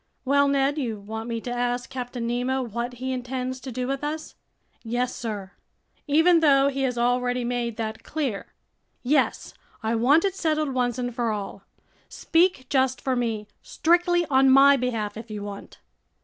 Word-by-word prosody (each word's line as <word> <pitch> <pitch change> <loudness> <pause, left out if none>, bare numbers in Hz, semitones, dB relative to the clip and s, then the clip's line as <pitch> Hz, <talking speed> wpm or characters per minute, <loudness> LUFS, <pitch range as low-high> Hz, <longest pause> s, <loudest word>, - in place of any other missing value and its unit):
"Well, 280 +1 +4
Ned, 280 +1 +1
you 230 -6 -3
want 220 +3 -6
me 230 -1 -2
to 245 - -5
ask 245 0 -1
Captain 245 -2 -5
Nemo 250 +2 -1
what 235 +1 -4
he 260 +2 -4
intends 255 0 -3
to 260 0 -7
do 250 +1 -3
with 275 +2 -3
us?" 310 +1 -4 0.5
"Yes, 245 +2 -2
sir." 205 -5 -5 0.6
"Even 325 +4 +5
though 280 -3 +5
he 275 0 -3
has 250 -2 0
already 245 +1 +1
made 240 -2 -2
that 220 -1 -4
clear?" 275 -10 -3 0.6
"Yes. 270 +1 +1 0.3
I 220 +1 0
want 270 - +4
it 390 - 0
settled 310 -6 -1
once 245 -1 0
and 245 -1 -3
for 235 -1 -1
all. 205 -2 -6 0.4
Speak 330 -5 +1
just 260 -2 +1
for 260 -1 -1
me, 225 -4 -2
strictly 350 +1 +2
on 270 -2 +4
my 275 +1 +7
behalf, 230 -5 -2
if 225 +1 -9
you 210 -1 -5
want." 200 -1 -8
250 Hz, 170 wpm, -25 LUFS, 235-275 Hz, 0.6 s, my